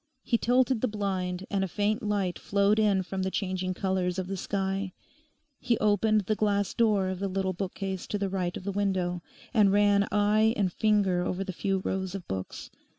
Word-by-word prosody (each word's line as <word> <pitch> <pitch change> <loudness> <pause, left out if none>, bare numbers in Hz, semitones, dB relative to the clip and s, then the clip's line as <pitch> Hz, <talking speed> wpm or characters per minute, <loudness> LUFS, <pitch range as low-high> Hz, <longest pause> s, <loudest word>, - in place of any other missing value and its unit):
He - - +1
tilted 250 0 +2
the 255 - +2
blind, 190 -3 -2
and 195 -1 +1
a - - 0
faint 210 +3 0
light 200 -4 -1
flowed 200 +1 +2
in 200 -3 +3
from 190 +1 -4
the 190 - 0
changing 185 -1 -2
colours 185 -1 -1
of 185 - -2
the 195 +2 -4
sky. 195 0 -2 0.7
He 240 -2 +1
opened 215 +1 +3
the 205 +2 -1
glass 205 -2 0
door 210 -5 +2
of 185 -1 -4
the 200 - -1
little 190 0 -1
bookcase 190 0 -4
to 210 - -2
the 200 -1 -1
right 185 -2 -2
of - - -9
the 200 - -2
window, 185 -3 -1 0.3
and 210 -4 +5
ran 205 0 +4
eye 215 +2 +3
and 190 -4 0
finger 200 -5 +2
over 185 +1 -2
the 190 -1 -5
few 195 +1 -1
rows 190 0 -2
of 190 -3 -7
books. 95 -1 -6
195 Hz, 200 wpm, -28 LUFS, 185-210 Hz, 0.7 s, and